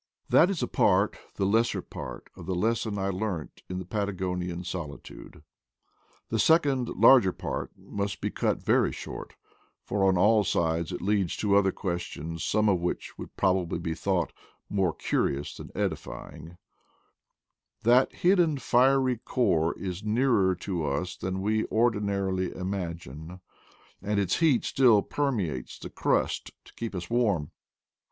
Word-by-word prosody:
That 175 - +6
is 195 -5 -1
a - - 0
part, - - +2 0.2
the 95 - 0
lesser 115 +4 +2
part, - - -8
of 85 - -11
the 95 - -1
lesson 110 +2 0
I 95 0 -1
learnt 95 -4 -4
in 90 - -3
the 95 - -5
Patagonian 90 -3 -3
solitude: 85 -5 -8 0.9
the 110 - -1
second 140 -4 +3
larger 120 -9 +6
part - - -4
must 100 0 -4
be - - -2
cut - - -1
very - - +3
short; - - -8 0.5
for 100 -1 -1
on 95 -1 +3
all 105 +3 +4
sides 85 -2 0
it 90 - -5
leads 100 -3 +1
to 100 -2 +2
other 100 -1 +4
questions, 85 -3 -4
some 105 0 +2
of 95 -4 +3
which 90 +1 -3
would - - -9
probably 90 -3 +1
be 85 -1 -3
thought 90 0 -1 0.4
"more 95 -4 +2
curious 70 -2 -1
than - - -9
edify - - -4
ing/ 80 +3 -12 0.6
' - - -48
That 120 +3 +5
hidden 175 -5 +3
fiery 130 0 +3
core 90 -10 +1
is 95 0 -5
nearer 110 -4 +2
to 90 -2 -3
us 75 +6 -2
than 95 +1 -4
we 110 +1 +1
ordinarily 100 -5 0
imagine, 85 -3 -5 0.6
and 105 +1 0
its 95 -3 +1
heat 155 -8 +3
still 120 -6 +4
permeates 100 - -2
the - - -9
crust - - 0 0.2
to - - -17
keep 115 -4 -5
us 85 -1 -4
warm. 100 -10 +1
95 Hz, 150 wpm, -28 LUFS, 90-110 Hz, 0.9 s, That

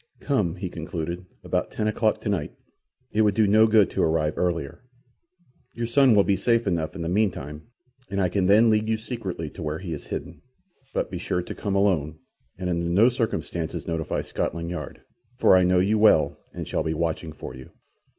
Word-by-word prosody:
"Come," 105 - 0
he 95 0 -4
concluded, 85 +1 -5 0.2
"about - - -1
ten 105 - -2
o'clock 110 0 +1
tonight. 100 -8 -2 0.6
It 110 - +2
would 105 -2 +3
do 110 - +4
no 110 +2 +5
good 110 -2 +4
to - - -1
arrive 80 -1 +1
earlier. 85 - -2 0.9
Your 115 - -2
son 125 0 +4
will 100 - +6
be 100 - +2
safe 115 +2 +1
enough 85 -4 -1
in 85 - -4
the - - -3
meantime, 85 -6 -1 0.4
and 100 0 -2
I 95 - +3
can 90 +1 0
then 110 +3 +6
lead 110 0 +1
you 110 - +1
secretly 110 -8 -5
to - - -10
where 75 0 -2
he 85 -1 -5
is 75 - -7
hidden. - - -6 0.5
But - - -2
be 90 - -4
sure 90 0 -2
to - - -6
come 100 -2 -3
alone, 85 -7 +1 0.4
and 90 0 -4
under 85 -1 -1
no 100 +8 +5
circumstances 110 -8 -3
notify 80 -2 -2
Scotland 85 0 -3
Yard, 80 -5 -6 0.4
for - - +5
I 95 - +6
know 90 0 +3
you 100 +4 +2
well 105 -7 +5 0.2
and - - -7
shall - - -1
be 80 0 -2
watching 80 0 -2
for 65 -4 -9
you. 65 0 -11
90 Hz, 200 wpm, -25 LUFS, 80-105 Hz, 0.9 s, will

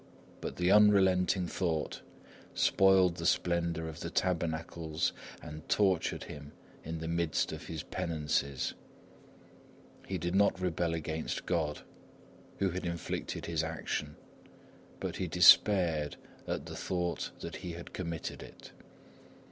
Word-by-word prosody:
But - - -4
the 90 +1 +2
unrelenting 95 -3 +5
thought 85 -3 -2 0.5
spoiled 95 -2 +4
the 85 - -4
splendour 85 -2 +1
of 80 - -7
the - - -4
tabernacles 80 -2 -1 0.3
and 75 +1 -9
tortured 95 -5 +2
him 75 0 -9 0.3
in 80 +1 -4
the 80 0 -5
midst 85 -1 0
of - - -7
his 80 -3 -5
penances. 75 -4 -1 1.3
He - - -2
did 85 +1 -2
not 100 -1 +3
rebel 85 -2 0
against 80 0 -3
God, 80 -4 -1 0.8
who 95 -2 +1
had 95 +2 -4
inflicted 85 -2 -3
his - - -1
action, 75 -1 -3 0.8
but - - -4
he 95 - -2
despaired 85 -2 +5 0.3
at - - -3
the - - -7
thought 90 -2 -2
that - - -5
he 90 -2 -6
had 85 0 -9
committed 85 -3 -4
it. - - -12
85 Hz, 125 wpm, -32 LUFS, 80-90 Hz, 1.3 s, unrelenting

